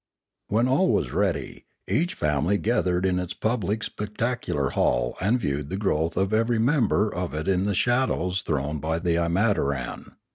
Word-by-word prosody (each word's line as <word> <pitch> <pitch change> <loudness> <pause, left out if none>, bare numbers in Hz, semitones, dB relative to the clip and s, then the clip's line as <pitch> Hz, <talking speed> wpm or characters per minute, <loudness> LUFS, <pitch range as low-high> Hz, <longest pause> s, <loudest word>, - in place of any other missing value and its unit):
When 115 +4 +2
all 140 +9 +3
was - - 0
ready, - - -1 0.2
each 175 +4 0
family 75 +5 +1
gathered 95 -5 +1
in 90 -1 +1
its 90 -1 -4
public 110 -2 -1
spectacular 105 - -2
hall - - +1
and 110 +7 +2
viewed 70 -6 -2
the 95 - -3
growth 85 -5 0
of 95 +2 +1
every 115 +2 +2
member 110 -4 +2
of 90 -3 -3
it 75 0 -3
in 95 0 +2
the 100 -1 0
shadows 95 -7 +1
thrown 75 -1 -2
by 80 +2 -1
the 85 0 0
imataran. 85 - 0
95 Hz, 160 wpm, -25 LUFS, 80-110 Hz, 0.2 s, all